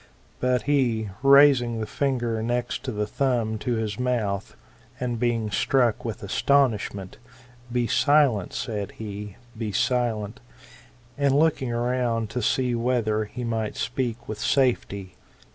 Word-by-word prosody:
But 125 Hz, 0 st, +1 dB
he, 120 Hz, -7 st, +1 dB
raising 135 Hz, -4 st, +6 dB
the 110 Hz, -, -2 dB
finger 120 Hz, -3 st, -1 dB
next 120 Hz, +1 st, -2 dB
to 130 Hz, -, -2 dB
the 105 Hz, -2 st, -1 dB
thumb 115 Hz, -2 st, -1 dB
to 125 Hz, -, -1 dB
his 110 Hz, -1 st, -3 dB
mouth, 110 Hz, -6 st, -1 dB, 0.4 s
and 120 Hz, -2 st, -2 dB
being 115 Hz, -3 st, 0 dB
struck 120 Hz, +2 st, +2 dB
with 115 Hz, -3 st, -5 dB
astonishment, 110 Hz, -4 st, 0 dB, 0.5 s
£e 120 Hz, -1 st, 0 dB
silent, 140 Hz, -6 st, +3 dB
said 105 Hz, -4 st, -4 dB
he, 105 Hz, -2 st, -7 dB, 0.2 s
be 110 Hz, -2 st, -3 dB
silent; 115 Hz, 0 st, 0 dB, 0.8 s
and 140 Hz, -1 st, +3 dB
looking 150 Hz, -4 st, +2 dB
round 120 Hz, -2 st, -1 dB
to 125 Hz, +2 st, -2 dB
see 125 Hz, +3 st, +1 dB
whether 115 Hz, -3 st, 0 dB
he 125 Hz, +4 st, -7 dB
might 115 Hz, -2 st, -2 dB
speak 120 Hz, -2 st, -3 dB
with 110 Hz, -1 st, -5 dB
safety. 105 Hz, -8 st, 0 dB
120 Hz, 130 wpm, -25 LUFS, 110-125 Hz, 0.8 s, raising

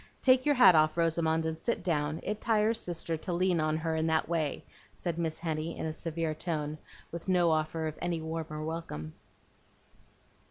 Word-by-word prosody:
Take 255 Hz, +1 st, +4 dB
your 290 Hz, -, +4 dB
hat 245 Hz, -7 st, +8 dB
off, 155 Hz, 0 st, +3 dB
Rosamond, 165 Hz, -1 st, +1 dB
and 160 Hz, 0 st, -3 dB
sit 225 Hz, 0 st, -1 dB
down. 155 Hz, -3 st, -1 dB
It 210 Hz, +1 st, -3 dB
tires 220 Hz, 0 st, +2 dB
Sister 165 Hz, -1 st, -2 dB
to 180 Hz, +4 st, -5 dB
lean 180 Hz, 0 st, +2 dB
on 155 Hz, 0 st, +1 dB
her 160 Hz, 0 st, -1 dB
in 160 Hz, 0 st, 0 dB
that 160 Hz, 0 st, +1 dB
way," 160 Hz, -4 st, -1 dB, 0.3 s
said 170 Hz, -2 st, -3 dB
Miss 160 Hz, -2 st, -1 dB
Henny 160 Hz, 0 st, -3 dB
in -, -, -3 dB
a 160 Hz, -, -2 dB
severe 165 Hz, 0 st, -2 dB
tone, 155 Hz, -1 st, -3 dB, 0.3 s
with 170 Hz, +2 st, -7 dB
no 175 Hz, -3 st, +3 dB
offer 160 Hz, +1 st, 0 dB
of 155 Hz, -1 st, -5 dB
any 170 Hz, -2 st, -1 dB
warmer 160 Hz, -1 st, -4 dB
welcome. 115 Hz, -, -5 dB
165 Hz, 185 wpm, -30 LUFS, 155-175 Hz, 0.3 s, hat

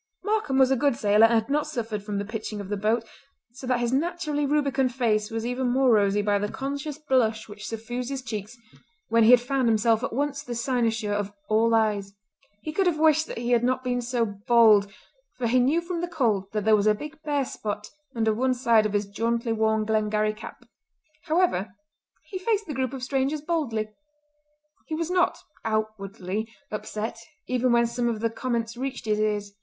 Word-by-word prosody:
Markam 415 Hz, -11 st, 0 dB
was 265 Hz, -1 st, +5 dB
a -, -, +4 dB
good 280 Hz, 0 st, +2 dB
sailor 210 Hz, 0 st, +5 dB
and 230 Hz, +1 st, +3 dB
had 220 Hz, -, -14 dB
not 300 Hz, +1 st, +1 dB
suffered 225 Hz, -8 st, -3 dB
from 205 Hz, 0 st, -4 dB
the 200 Hz, -, -2 dB
pitching 215 Hz, 0 st, -5 dB
of 200 Hz, -1 st, -7 dB
the 205 Hz, -, -1 dB
boat, 220 Hz, +3 st, 0 dB, 0.4 s
so 255 Hz, +1 st, -9 dB
that 250 Hz, -1 st, +1 dB
his 240 Hz, +1 st, 0 dB
naturally 300 Hz, -1 st, 0 dB
rubicund 275 Hz, -3 st, +1 dB
face 215 Hz, -4 st, +1 dB
was 225 Hz, 0 st, -3 dB
even 250 Hz, +1 st, -1 dB
more 260 Hz, 0 st, +3 dB
rosy 205 Hz, -1 st, +3 dB
by 205 Hz, -1 st, +2 dB
the 205 Hz, +1 st, -2 dB
conscious 280 Hz, +2 st, -4 dB
blush 250 Hz, -7 st, +1 dB
which 210 Hz, 0 st, -9 dB
suffused 240 Hz, +3 st, -4 dB
his 270 Hz, -2 st, -4 dB
cheeks 220 Hz, 0 st, -6 dB, 0.5 s
when 230 Hz, 0 st, +4 dB
he -, -, +6 dB
had 250 Hz, 0 st, +9 dB
found 260 Hz, 0 st, 0 dB
himself 225 Hz, +1 st, +3 dB
at -, -, -2 dB
once 280 Hz, +3 st, -1 dB
the 245 Hz, -4 st, -6 dB
cynosure 230 Hz, -3 st, 0 dB
of 205 Hz, -1 st, -2 dB, 0.2 s
all 225 Hz, +1 st, +3 dB
eyes. 205 Hz, -3 st, 0 dB, 0.5 s
He 310 Hz, -, -4 dB
could 385 Hz, +2 st, +2 dB
have 340 Hz, -3 st, +1 dB
wished 315 Hz, 0 st, +4 dB
that -, -, -7 dB
he 240 Hz, +1 st, -2 dB
had 240 Hz, -1 st, +3 dB
not 255 Hz, +1 st, +1 dB
been 245 Hz, -1 st, -1 dB
so 240 Hz, -1 st, 0 dB
bold 210 Hz, -1 st, +4 dB, 0.5 s
for 250 Hz, -, -2 dB
he 245 Hz, +2 st, +3 dB
knew 280 Hz, +7 st, +3 dB
from 340 Hz, 0 st, -4 dB
the 350 Hz, -, -2 dB
cold 235 Hz, -, 0 dB
that 210 Hz, -1 st, -2 dB
there 220 Hz, 0 st, +6 dB
was 210 Hz, 0 st, +1 dB
a 210 Hz, -, +5 dB
big 300 Hz, +7 st, -9 dB
bare 290 Hz, -3 st, 0 dB
spot 210 Hz, -3 st, -5 dB, 0.2 s
under 220 Hz, -1 st, +2 dB
one 255 Hz, +3 st, +1 dB
side 230 Hz, -3 st, +3 dB
of 210 Hz, -, -7 dB
his 205 Hz, 0 st, +1 dB
jauntily 230 Hz, +3 st, -1 dB
worn 220 Hz, -1 st, +1 dB
Glengarry 215 Hz, 0 st, +1 dB
cap. 215 Hz, -, -11 dB, 0.6 s
However, 305 Hz, -, +1 dB, 0.5 s
he 375 Hz, -, -6 dB
faced 425 Hz, +1 st, 0 dB
the 310 Hz, -, -5 dB
group 260 Hz, -1 st, -2 dB
of 260 Hz, -2 st, -6 dB
strangers 270 Hz, +3 st, 0 dB
boldly. 290 Hz, -10 st, -1 dB, 1.0 s
He 315 Hz, -, -3 dB
was 330 Hz, +2 st, -2 dB
not, 360 Hz, -1 st, +2 dB, 0.3 s
outwardly, 215 Hz, -1 st, -3 dB, 0.2 s
upset 215 Hz, +1 st, -4 dB, 0.3 s
even 250 Hz, 0 st, +1 dB
when 235 Hz, 0 st, +4 dB
some 240 Hz, +1 st, -1 dB
of 220 Hz, -2 st, -3 dB
the 230 Hz, 0 st, 0 dB
comments 230 Hz, -1 st, -2 dB
reached 260 Hz, 0 st, -5 dB
his 215 Hz, -1 st, +1 dB
ears. 210 Hz, -1 st, -1 dB
235 Hz, 205 wpm, -26 LUFS, 215-270 Hz, 1.0 s, had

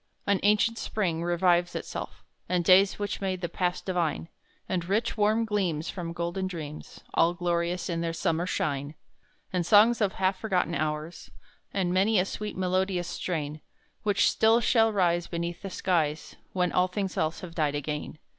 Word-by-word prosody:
An 200 Hz, -1 st, +2 dB
ancient 210 Hz, +3 st, +3 dB
Spring 175 Hz, -6 st, -1 dB
revives 175 Hz, 0 st, +2 dB
itself, -, -, -6 dB, 0.3 s
And 180 Hz, -2 st, +1 dB
days 190 Hz, +2 st, +6 dB
which 205 Hz, -1 st, -3 dB
made 185 Hz, -2 st, -2 dB
the 175 Hz, -, -1 dB
past 180 Hz, +1 st, -2 dB
divine; 170 Hz, -3 st, -1 dB, 0.4 s
And 180 Hz, -2 st, -1 dB
rich 220 Hz, +4 st, +1 dB
warm 215 Hz, +2 st, +2 dB
gleams 180 Hz, -7 st, -1 dB
from 170 Hz, -3 st, -5 dB
golden 175 Hz, +3 st, -2 dB
dreams, 155 Hz, -5 st, -8 dB
All 170 Hz, +1 st, +3 dB
glorious 175 Hz, 0 st, -1 dB
in 170 Hz, -1 st, -2 dB
their 165 Hz, 0 st, -1 dB
summer 165 Hz, +1 st, -1 dB
shine; 145 Hz, -3 st, -2 dB, 0.6 s
And 180 Hz, -1 st, +1 dB
songs 220 Hz, +6 st, +5 dB
of 200 Hz, -2 st, +2 dB
half 190 Hz, 0 st, 0 dB
forgotten 185 Hz, -6 st, 0 dB
hours, 155 Hz, +1 st, -3 dB, 0.4 s
And 185 Hz, -3 st, 0 dB
many 200 Hz, +4 st, +3 dB
a 180 Hz, -, +3 dB
sweet 210 Hz, +1 st, -5 dB
melodious 185 Hz, -1 st, 0 dB
strain, 155 Hz, -4 st, -3 dB, 0.4 s
Which 205 Hz, -2 st, +3 dB
still 225 Hz, +1 st, +4 dB
shall 225 Hz, -1 st, +3 dB
rise 175 Hz, -4 st, +1 dB
Beneath 170 Hz, 0 st, -4 dB
the 195 Hz, -, -5 dB
skies 160 Hz, -5 st, -1 dB, 0.2 s
When 180 Hz, -1 st, 0 dB
all 180 Hz, 0 st, +3 dB
things 190 Hz, 0 st, -3 dB
else 160 Hz, +1 st, -1 dB
have 180 Hz, -3 st, -8 dB
died 150 Hz, -3 st, 0 dB
again. 150 Hz, +1 st, -4 dB
180 Hz, 165 wpm, -28 LUFS, 170-195 Hz, 0.6 s, days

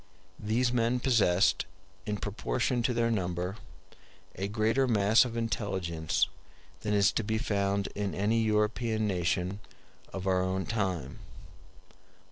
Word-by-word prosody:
These 120 Hz, +4 st, +1 dB
men 120 Hz, +1 st, +2 dB
possessed, 110 Hz, -8 st, +3 dB, 0.4 s
in 105 Hz, -1 st, -1 dB
proportion 120 Hz, +4 st, -1 dB
to 120 Hz, -, +1 dB
their 115 Hz, 0 st, +2 dB
number, 90 Hz, -1 st, -2 dB, 0.8 s
a 95 Hz, -, -3 dB
greater 110 Hz, +5 st, +1 dB
mass 110 Hz, 0 st, +4 dB
of 115 Hz, -1 st, -5 dB
intelligence 95 Hz, -8 st, -1 dB, 0.5 s
than 105 Hz, +2 st, -1 dB
is 100 Hz, -1 st, +4 dB
to 115 Hz, -, -1 dB
be 110 Hz, +1 st, -1 dB
found 100 Hz, -2 st, 0 dB
in 100 Hz, -1 st, -3 dB
any 110 Hz, +4 st, +1 dB
European 110 Hz, +1 st, +1 dB
nation 90 Hz, 0 st, -1 dB, 0.5 s
of 95 Hz, -1 st, -5 dB
our 95 Hz, -1 st, +2 dB
own 95 Hz, +1 st, -1 dB
time. 95 Hz, -, -2 dB
105 Hz, 125 wpm, -30 LUFS, 95-115 Hz, 0.8 s, mass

